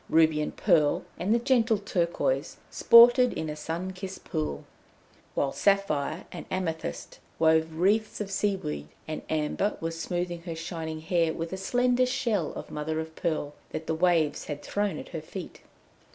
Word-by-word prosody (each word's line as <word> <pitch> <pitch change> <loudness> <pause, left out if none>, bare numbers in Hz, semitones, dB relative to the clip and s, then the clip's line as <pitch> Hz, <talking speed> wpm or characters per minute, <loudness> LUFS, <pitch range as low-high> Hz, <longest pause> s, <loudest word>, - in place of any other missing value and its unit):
Ruby 160 -1 +4
and 150 - -4
Pearl, 160 -7 +3
and 190 +4 0
the 230 - +5
gentle 235 -3 +3
Turquoise 195 - -1
sported 240 +2 +7
in 160 - -3
a - - -5
sun 165 +4 -4
kissed 185 +1 -7
pool; 75 -2 -3 0.7
while 140 - +1
Sapphire 180 -5 +1
and - - -8
Amethyst 165 -4 -4 0.2
wove 160 0 +3
wreaths 205 +6 +1
of 205 -2 -4
seaweed, 190 - -1 0.2
and 155 - -4
Amber 160 +6 0
was 165 0 -4
smoothing 175 +1 -3
her 170 -1 -6
shining 160 -1 -5
hair 165 0 +1
with 165 +2 -4
a - - 0
slender 245 +5 +2
shell 220 - 0
of - - -8
mother 155 +1 -2
of 160 0 -6
pearl 155 -4 -2 0.2
that 155 - -5
the 160 - -1
waves 165 -3 +2
had 145 -1 -6
thrown 205 -1 -1
at - - -8
her 160 - -5
feet. 175 +3 -8
170 Hz, 165 wpm, -28 LUFS, 160-200 Hz, 0.7 s, sported